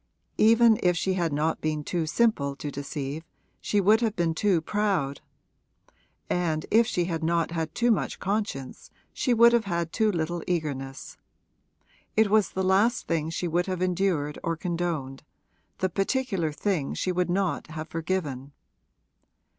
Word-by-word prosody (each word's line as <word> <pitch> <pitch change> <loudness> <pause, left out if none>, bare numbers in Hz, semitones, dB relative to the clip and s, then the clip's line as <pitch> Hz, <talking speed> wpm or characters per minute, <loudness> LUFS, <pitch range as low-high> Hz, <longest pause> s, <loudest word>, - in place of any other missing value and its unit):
Even 225 0 +6
if 180 -1 +2
she 190 +3 0
had 170 -3 0
not 155 +3 0
been 155 -1 -1
too 165 0 -2
simple 155 -8 +1
to 145 +1 -5
deceive 140 +1 -5 0.4
she 205 - 0
would 210 +4 +4
have 225 -2 0
been 170 -2 +1
too 185 +1 +2
proud; 180 -6 -1 1.1
and 160 -3 -1
if 230 +1 +5
she 175 -7 0
had 165 -2 -3
not 165 0 +1
had 160 -2 -3
too 240 0 +3
much 215 - 0
conscience 195 -10 -3 0.2
she 255 - 0
would 235 0 +6
have 235 -2 +2
had 170 -3 -2
too 220 -2 +2
little 170 -1 -2
eagerness. 140 -6 -3 1.0
It 220 -2 +4
was 215 -4 +4
the 190 - -2
last 200 +6 +2
thing 160 -1 -1
she 170 +2 -2
would 175 +2 0
have 185 -2 -2
endured 180 -5 0
or 165 -1 -1
condoned 165 -6 -3 0.6
the 185 - +1
particular 195 - -1
thing 155 -2 -2
she 185 - -1
would 180 0 0
not 190 0 -1
have 160 0 -6
forgiven. 155 -6 -3
175 Hz, 155 wpm, -26 LUFS, 155-200 Hz, 1.1 s, Even